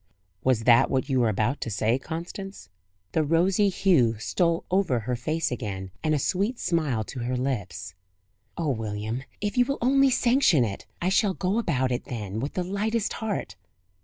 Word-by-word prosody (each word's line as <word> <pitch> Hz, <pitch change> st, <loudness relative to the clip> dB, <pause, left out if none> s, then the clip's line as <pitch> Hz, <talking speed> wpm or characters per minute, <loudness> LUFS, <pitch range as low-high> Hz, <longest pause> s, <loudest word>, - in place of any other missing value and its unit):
"Was 125 Hz, -4 st, +2 dB
that 120 Hz, 0 st, +6 dB
what 135 Hz, +2 st, 0 dB
you 130 Hz, -1 st, +2 dB
were 120 Hz, -2 st, +3 dB
about 110 Hz, +7 st, 0 dB
to -, -, -3 dB
say, 110 Hz, +4 st, +1 dB
Constance?" 175 Hz, +6 st, -7 dB, 0.4 s
The 160 Hz, -, +2 dB
rosy 180 Hz, +6 st, +3 dB
hue 170 Hz, -, +3 dB
stole 170 Hz, -, 0 dB
over 180 Hz, -11 st, +2 dB
her 125 Hz, +3 st, -2 dB
face 155 Hz, +6 st, -1 dB
again, 95 Hz, -6 st, -4 dB
and 155 Hz, -1 st, +2 dB
a -, -, +2 dB
sweet 200 Hz, -, 0 dB
smile 150 Hz, -, 0 dB
to 125 Hz, -, -8 dB
her 125 Hz, +1 st, -2 dB
lips: 100 Hz, -10 st, -3 dB, 0.6 s
"Oh, 165 Hz, -3 st, -1 dB
William, 110 Hz, +1 st, -3 dB, 0.2 s
if 205 Hz, +4 st, -1 dB
you 245 Hz, -, +5 dB
will 275 Hz, +1 st, -2 dB
only 275 Hz, +2 st, +4 dB
sanction 240 Hz, -, +4 dB
it! 100 Hz, -3 st, -6 dB, 0.2 s
I 180 Hz, -, +2 dB
shall 195 Hz, 0 st, +2 dB
go 195 Hz, +4 st, 0 dB
about 130 Hz, -, 0 dB
it 125 Hz, -, -2 dB
then 105 Hz, -3 st, -5 dB
with 140 Hz, +5 st, -3 dB
the 180 Hz, -, 0 dB
lightest 210 Hz, +4 st, -1 dB
heart!" 220 Hz, -3 st, -3 dB
145 Hz, 180 wpm, -26 LUFS, 115-195 Hz, 0.6 s, that